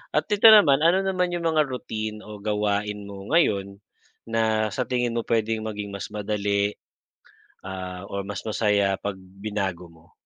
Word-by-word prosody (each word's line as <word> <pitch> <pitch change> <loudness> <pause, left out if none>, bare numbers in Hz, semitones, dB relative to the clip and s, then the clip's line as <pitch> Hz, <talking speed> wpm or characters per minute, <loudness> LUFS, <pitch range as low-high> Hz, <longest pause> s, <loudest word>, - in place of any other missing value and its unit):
at 150 +1 +2
ito 210 +2 +6
naman 180 -11 +7
ano 175 +4 +4
naman 180 -2 +1
yung 170 -1 -4
mga 155 -2 +2
routine 110 -4 -4
o 105 -1 -9
gawain 105 0 -1
mo 100 0 -9
ngayon, 100 - +2 0.5
na 110 -1 +1
sa 125 - -2
tingin 125 -2 0
mo 115 - +1
puwedeng 110 -1 0
maging 105 -1 -5
mas 100 - -5
madali, 105 -1 -1 0.9
ah 95 -1 -6
or 100 0 -3
mas 100 -3 -5
masaya 105 -3 +1
kapag 100 -1 -4 0.2
binago 100 -4 -3
mo? 80 -1 -21
105 Hz, 160 wpm, -25 LUFS, 100-125 Hz, 0.9 s, naman